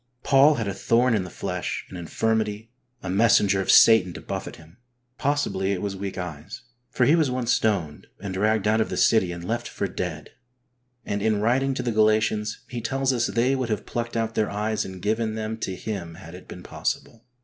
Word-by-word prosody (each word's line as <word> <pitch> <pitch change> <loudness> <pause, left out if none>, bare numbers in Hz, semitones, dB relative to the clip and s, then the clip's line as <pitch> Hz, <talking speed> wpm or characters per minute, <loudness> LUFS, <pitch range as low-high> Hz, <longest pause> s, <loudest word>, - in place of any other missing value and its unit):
Paul 140 +3 +5
had 115 -5 -3
a 100 - -2
thorn 120 +4 +2
in 100 -4 0
the - - -8
flesh, - - -4
an - - -8
infirmity, 110 +5 -2 0.3
a 95 - -4
messenger 100 -1 +4
of 95 - -5
Satan 110 -6 +6
to - - -8
buffet - - -5
him. 80 +5 -17 0.4
Possibly 135 -10 0
it 90 - -3
was 100 -1 -3
weak 95 0 -5
eyes, 90 +6 -7 0.3
for 125 - +1
he 150 +6 +5
was 155 -5 +2
once 125 -1 -1
stoned 90 -9 -1
and 95 0 -5
dragged 105 +2 +1
out 110 +1 +3
of - - -1
the - - -4
city 100 -6 +3
and 85 0 -7
left 115 +5 -2
for - - -3
dead, 80 -5 -5 0.7
and 100 0 -2
in 110 0 +1
writing 130 +5 +1
to - - -3
the 120 - -1
Galatians, 110 0 +1
he 120 -1 -5
tells 135 +3 0
us 120 -1 +1
they 125 +4 +1
would 130 -3 -2
have 105 - -2
plucked 120 -1 -3
out 115 0 -1
their 110 - 0
eyes 105 +1 -2
and 95 -1 -9
given 110 +1 0
them 110 0 -3
to 95 -3 -3
him 90 -6 -5
had 85 -1 -12
it 90 - -12
been 90 - -10
possible. 115 - -4
110 Hz, 210 wpm, -24 LUFS, 95-115 Hz, 0.7 s, Satan